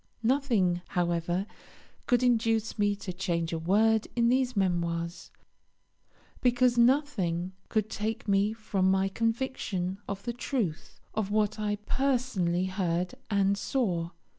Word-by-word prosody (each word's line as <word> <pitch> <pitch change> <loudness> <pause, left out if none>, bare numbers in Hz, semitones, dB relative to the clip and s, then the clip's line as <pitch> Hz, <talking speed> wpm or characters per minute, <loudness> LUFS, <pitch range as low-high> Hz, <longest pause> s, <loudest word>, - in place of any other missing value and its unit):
Nothing, 225 -9 +2
however, 175 +1 0 0.6
could 245 -1 +3
induce 225 -2 +1
me 205 0 +2
to 195 -2 -6
change 170 -3 -2
a 165 - -1
word 215 +6 +3
in 235 -1 +3
these 255 -2 +1
Memoirs, 170 -2 -1 1.1
because 245 0 +3
nothing 235 - +2 0.2
could 215 -2 +1
take 220 +1 -3 0.3
from 205 -4 -1
me - - +5
my 190 0 +2
conviction 220 -4 -2
of 200 0 -5
the 240 - -3
truth 230 - -3
of 215 -2 -1
what 215 0 +1
I 210 -1 0
personally 240 -10 +1
heard 180 -2 -1 0.2
and 200 -1 +2
saw. 190 -7 -1
205 Hz, 125 wpm, -29 LUFS, 180-235 Hz, 1.1 s, me